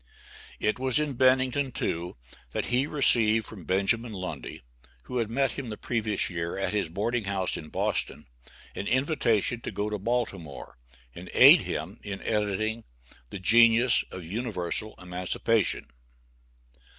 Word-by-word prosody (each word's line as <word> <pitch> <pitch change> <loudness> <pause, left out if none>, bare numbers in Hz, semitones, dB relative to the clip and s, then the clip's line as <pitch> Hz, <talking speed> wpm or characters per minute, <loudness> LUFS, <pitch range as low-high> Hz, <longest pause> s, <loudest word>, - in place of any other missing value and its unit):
It 105 +3 0
was 130 -2 +1
in 150 -2 -1
Bennington, 130 +2 +2
too, 85 - -3 0.4
that - - -1
he 130 +3 +2
received 115 -7 +3
from 95 -7 -11
Benjamin 110 +5 +1
Lundy, 95 -9 -6 0.4
who 125 - -3
had 115 -2 -1
met 135 +2 +1
him 135 -4 -6
the 105 - -6
previous 110 -4 -1
year 85 -1 -4
at 95 - -2
his 100 -6 0
boarding 110 +6 -2
house 95 -2 -1
in 75 - -8
Boston, - - -2 0.5
an 100 - -5
invitation 125 - +1
to - - -5
go 105 +1 -3
to 105 - -3
Baltimore, 100 - -4 0.3
and - - -10
aid - - +9
him 85 +8 -5
in 100 -1 -6
editing 110 +1 -1 0.5
the - - -6
"Genius 115 +5 +5
of 90 -3 -8
Universal 105 0 -4
Emancipation." 90 +4 -1
110 Hz, 140 wpm, -27 LUFS, 95-120 Hz, 0.5 s, aid